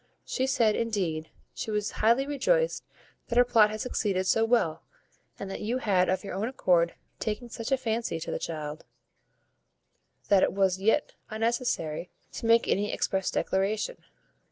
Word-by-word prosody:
She 260 0 -1
said, 230 -5 +3
indeed, 185 -9 -2 0.2
she - - -5
was 210 -1 -1
highly 235 +5 +4
rejoiced 485 - +1 0.4
that 235 - -2
her 245 - +7
plot 225 -3 +5
had 215 0 -4
succeeded 195 -6 -1
so 225 +4 +3
well, 195 -9 +1 0.6
and 200 - -6
that - - -5
you 225 +4 -1
had 190 -7 +2
of 185 +3 0
your 195 - -6
own 200 +4 -1
accord 175 -9 +2 0.2
taken 230 +2 -3
such 230 +2 -6
a 270 - +4
fancy 225 -7 -2
to - - -4
the - - -2
child, 155 -1 -5 1.4
that 200 -2 +5
it - - +2
was 190 -1 +2
yet 225 +8 +2 0.2
unnecessary 220 -8 -1 0.2
to 230 - -4
make 230 0 +5
any 205 +1 +1
express 190 -1 -1
declaration. 205 - -1
215 Hz, 160 wpm, -28 LUFS, 190-235 Hz, 1.4 s, her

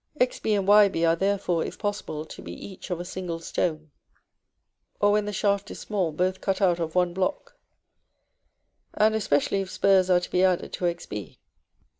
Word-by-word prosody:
Xb 235 -4 +1
and 195 -1 -2
Yb 200 -5 +5
are 165 - +4
therefore, 190 -2 0
if - - -6
possible, 205 -7 -4
to - - -11
be 85 - -8
each 190 - -10
of 175 -2 -2
a 175 - -5
single 180 -2 -5
stone; 155 -2 -2 1.1
or, 205 0 +4
when 210 0 +2
the 210 - -3
shaft 200 0 0
is - - -8
small, 190 -6 -1
both 185 +4 -1
cut 195 -1 -1
out 180 -4 +2
of 160 0 -3
one 180 -1 +2
block, 190 +10 -2 1.4
and 215 +1 +3
especially 195 -2 +1
if 190 - -6
spurs 190 -2 +3
are 180 -1 +5
to 180 - -8
be 180 - +2
added 185 -2 +1
to 180 - -2
Xb. 165 - -4
185 Hz, 180 wpm, -26 LUFS, 170-200 Hz, 1.4 s, Yb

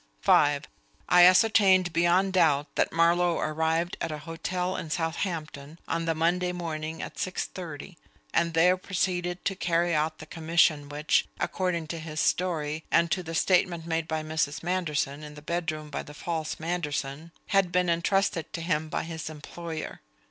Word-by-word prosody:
(5) - - +4 0.5
I 180 0 +8
ascertained 185 -2 +5
beyond 175 +3 +3
doubt 155 -5 +2
that - - +1
Marlowe 170 +1 +3
arrived 160 +3 0
at - - -2
a 155 - -4
hotel 180 +4 -3
in 160 - -5
Southampton 160 -2 -3
on 165 0 -1
the 165 -1 0
Monday 175 +3 +1
morning 160 -2 -4
at - - -8
six 185 - -2
thirty, 170 -1 -8 0.3
and 170 0 +1
there 180 +3 +5
proceeded 180 -1 -2
to 195 - 0
carry 175 -1 +1
out 155 0 0
the 155 - -10
commission 160 -2 +2
which, 150 +1 +1
according 180 -3 -1
to 165 +2 -5
his 155 -1 -5
story, 160 -4 0
and 170 -1 +3
to 185 - +1
the 165 -1 -6
statement 175 -2 +2
made 165 -1 -2
to 160 - 0
Mrs. 155 -2 -2
Manderson 155 -5 -1
in 150 -1 -9
the 150 - -10
bedroom 155 -2 -3
by - - -3
the 150 - -12
false 160 -1 -3
Manderson, 160 -2 -3 0.2
had 195 -3 +3
been 180 +1 +2
entrusted 170 0 +1
to 170 - -4
him 160 -2 -1
by - - -2
his 160 -1 -6
employer. 160 - -7
165 Hz, 165 wpm, -27 LUFS, 155-180 Hz, 0.5 s, I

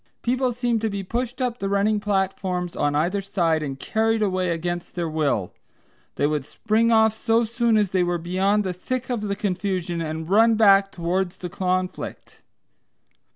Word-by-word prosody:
People 250 +1 +1
seemed 240 -2 -1
to 220 - 0
be 200 -1 -4
pushed 245 +5 -3
up 245 -1 -2
the 195 - -2
running 205 +2 +2
platforms 190 -3 -1
on 145 0 0
either 175 +7 +1
side, 170 -5 0
and 135 -2 -5
carried 220 +4 +1
away 185 -2 0
against 175 +1 -3
their 170 -2 -1
will. 145 - -1 0.6
They - - +1
would 150 -1 0
spring 220 - +1
off 220 -1 +5
so 225 +1 +1
soon 235 0 +1
as 205 -3 +1
they 185 - +2
were 175 0 +1
beyond 190 +5 +1
the 185 -2 -2
thick 255 +8 -4
of 240 -3 -1
the 200 -1 -2
confusion, 185 -3 -2
and 160 0 -4
run 225 +4 +5
back 195 -2 +5
towards 180 +1 -2
the 180 - -6
conflict. 185 +1 -3
195 Hz, 175 wpm, -23 LUFS, 175-220 Hz, 0.6 s, off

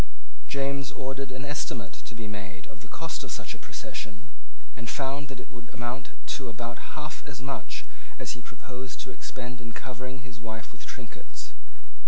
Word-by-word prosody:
James 140 -2 +5
ordered 135 +1 +2
an 130 +2 0
estimate 135 -7 +3
to 120 - -4
be 115 -1 0
made 95 -2 -2
of 110 - -9
the 110 - -6
cost 165 +5 +2
of - - -2
such - - +2
a - - -6
procession, 110 +7 -1 0.4
and 115 -2 0
found 140 +1 +4
that 135 -2 -2
it - - -5
would 120 0 -5
amount 120 +2 +2 0.2
to 130 -3 +3
about 115 +5 -1
half 150 0 +1
as 130 - -1
much 135 +2 +1 0.3
as - - +3
he 125 - -1
proposed 125 +1 -3
to 130 - -1
expend 125 -1 -1
in 115 -1 -2
covering 130 0 -1
his 120 -3 -5
wife 110 -3 -1
with - - -7
trinkets. - - -4
125 Hz, 180 wpm, -35 LUFS, 115-135 Hz, 0.4 s, James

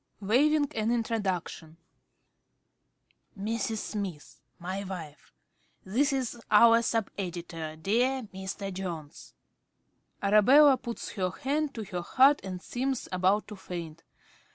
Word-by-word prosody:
~Smith~ 200 -1 -9
(waving 295 +4 +4
an 220 0 -1
introduction). 195 -8 -2 1.6
Mrs. 220 +2 -2
Smith 195 -8 -6 0.2
my 185 +3 -4
wife. 165 -6 -8 0.5
This 260 +10 +1
is 255 -3 -2
our 230 +2 +7
sub 225 -2 -1
editor, 170 -4 -5
dear 245 +10 +1
Mr. 190 +1 -5
Jones. 170 -5 -7 0.9
(_Arabella 260 +8 +6
puts 235 -2 -6
her 185 -3 -1
hand 285 +9 -2
to 225 - -4
her 185 -3 -5
heart 270 +10 +4
and 185 -1 -6
seems 260 +1 -2
about 185 +3 +2
to 210 - -7
faint. 170 -4 -7
205 Hz, 115 wpm, -29 LUFS, 180-240 Hz, 1.6 s, our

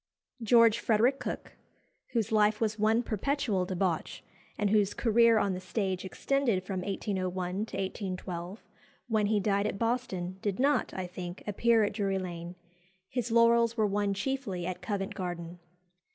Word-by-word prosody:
George 230 0 +5
Frederick 240 +5 +2
Cooke, 250 - -5 0.6
whose 225 -2 0
life 210 0 +3
was 220 -1 -1
one 220 +3 +3
perpetual 220 -4 0
debauch, 180 -2 -2 0.3
and 205 -2 +1
whose 205 -2 +2
career 230 0 +4
on 200 -2 +1
the 180 - -4
stage 185 0 -2
extended 230 0 0
from 190 -1 -3
1801 185 -2 -2 0.2
to - - -6
1812, 185 -1 -5 0.4
when 215 -3 +1
he 210 0 +2
died 200 0 +1
at 195 - -3
Boston, 195 -6 -2
did 200 -3 -1
not, 280 +3 +2
I 185 - -3
think, 180 0 -7
appear 225 +2 +3
at 205 - 0
Drury 200 -2 0
Lane. 175 -1 -6 0.5
His 245 -2 -2
laurels 230 0 +4
were 215 - +3
won 200 0 0
chiefly 200 -5 -3
at 180 0 -4
Covent 195 +1 -3
Garden. 175 -1 -5
205 Hz, 150 wpm, -30 LUFS, 185-230 Hz, 0.6 s, George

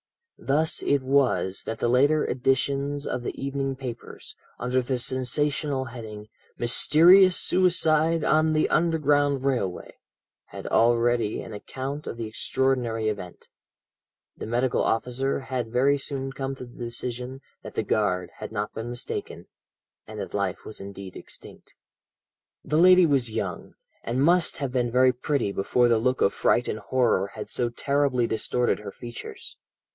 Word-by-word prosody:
"Thus 155 +4 +1
it 140 -2 +1
was 130 -8 +1
that 110 - -3
the - - 0
later 140 +5 +3
editions 140 +3 0
of 125 - -3
the 120 - -6
evening 135 0 -2
papers, 125 -3 -8 0.2
under 125 +1 0
the 125 +1 -2
sensational 130 +2 -1
heading, 110 -3 -9 0.3
'Mysterious 175 +10 +6
Suicide 165 -3 +2
on 155 +2 +3
the 155 - +2
Underground 145 -4 +2
Railway,' 120 -10 -2 0.5
had - - -10
already 120 -1 +2
an 115 - -9
account 135 +7 -6
of - - -5
the 115 - -4
extraordinary 115 0 0
event. 100 -4 -5 0.9
The - - -7
medical 120 +2 +1
officer 125 +4 -1
had 125 -4 -4
very 140 +4 +3
soon 135 -1 -4
come 135 0 -4
to 130 - -9
the 120 - -15
decision 125 +2 -5 0.2
that - - -10
the - - 0
guard 90 -4 0
had - - -6
not 105 -1 -3
been 115 +1 -5
mistaken, 120 0 -6 0.6
and 110 -1 -8
that - - -6
life 100 -2 -2
was 110 - -8
indeed 100 -1 -9
extinct. - - -12 0.9
"The 155 - +1
lady 180 +1 +7
was 135 -6 +2
young, 100 -6 -5 0.3
and 125 +4 -1
must 175 +2 +3
have 140 -3 -3
been 125 -2 0
very 130 +1 +4
pretty 125 -4 -1
before 120 +5 +2
the 115 -2 +3
look 125 +3 0
of 100 - +3
fright 120 - +2
and 110 - -3
horror 115 -4 +1
had 105 - -6
so 120 - -1
terribly 140 0 0
distorted 120 +2 0
her 105 -1 -8
features. 120 +1 -9
125 Hz, 150 wpm, -25 LUFS, 115-140 Hz, 0.9 s, lady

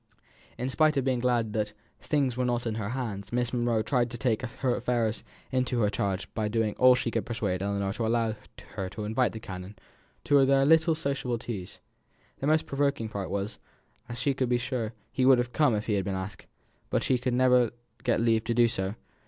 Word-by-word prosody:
In 125 - -2
spite 155 +2 +3
of 135 - +1
being 130 -2 +1
glad 120 -3 +1
that 105 -1 -1 0.3
"things 140 -5 0
were 125 - 0
not 120 -1 0
in 115 - -1
her 105 -2 -3
hands" 110 -5 -4
Miss 120 0 -1
Monro 120 -2 +1
tried 120 0 +1
to 120 - -6
take 115 -1 0
affairs 120 -2 -1 0.3
into 130 -1 0
her 105 -1 +2
charge 100 -1 -1
by 110 -1 -1
doing 110 -1 0
all 125 0 +7
she 120 - -1
could 115 - -1
to - - -17
persuade 100 -6 -2
Ellinor 100 0 -1
to 115 0 -2
allow 115 -1 +1 0.4
her 95 -1 -4
to 105 - -6
invite 110 +4 +1
the 110 - -6
canon 95 0 -8 0.5
to 140 -1 +5
their 135 0 +4
"little 160 +2 +5
sociable 140 -5 -2
teas." 110 -6 -6 0.6
The 135 - -2
most 155 +1 +3
provoking 140 -6 0
part 100 -3 -4
was, 100 +2 -3 0.5
that 120 0 -6
she 135 +3 +1
was 125 -2 +2
sure 120 -3 -3 0.2
he 130 - 0
would 130 0 +7
have 120 0 -2
come 145 -7 +3
if 105 - -2
he 110 - 0
had 100 -2 0
been 95 -1 -2
asked; 95 0 -6 0.4
but - - +1
she 125 - +2
could 125 0 -1
never 125 -2 +4 0.3
get 125 -3 +2
leave 115 -1 +2
to 115 - 0
do 120 0 +5
so. 95 -2 -3
120 Hz, 210 wpm, -28 LUFS, 105-130 Hz, 0.6 s, all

